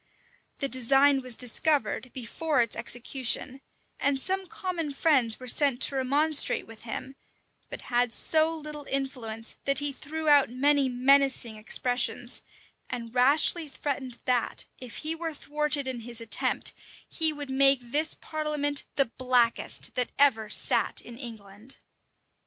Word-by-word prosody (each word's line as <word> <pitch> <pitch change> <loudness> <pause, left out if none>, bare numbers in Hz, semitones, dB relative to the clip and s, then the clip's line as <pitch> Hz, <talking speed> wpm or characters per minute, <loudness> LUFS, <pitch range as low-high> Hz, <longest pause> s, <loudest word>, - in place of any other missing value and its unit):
The 275 - +1
design 270 +2 +4
was 255 -2 +3
discovered 255 -1 +1
before 265 +3 -1
its 230 - -2
execution; 255 +2 0 0.4
and 280 -1 0
some 380 +5 -1
common 365 -8 -5
friends 270 -7 +2
were 255 - -10
sent 265 0 +3
to 275 - +3
remonstrate 285 +4 +2
with 225 -1 -14
him, 260 +3 -7 0.5
but - - -8
had 245 0 0
so 320 +5 +2
little 300 -2 -9
influence, 250 -5 -3
that 275 -1 +2
he 290 0 0
threw 315 +3 -6
out 290 -4 +5
many 275 +2 +1
menacing 260 -2 +2
expressions, 245 +3 0 0.5
and 235 -2 -6
rashly 290 +6 +4
threatened 265 -3 -5
that, 245 -2 -1
if 250 -3 -8
he 315 - -1
were 325 -1 -6
thwarted 295 -1 -2
in 255 -2 -4
his 235 0 -5
attempt, 230 -1 0 0.3
he 320 -2 +1
would 290 -2 -8
make 270 0 +5
this 290 +6 0
parliament 300 -2 -1
the 275 - +3
blackest 245 -1 -1
that 250 -1 -1
ever 225 -7 +3
sat - - +1
in 240 - -12
England. 225 -1 -10
270 Hz, 140 wpm, -27 LUFS, 245-295 Hz, 0.5 s, out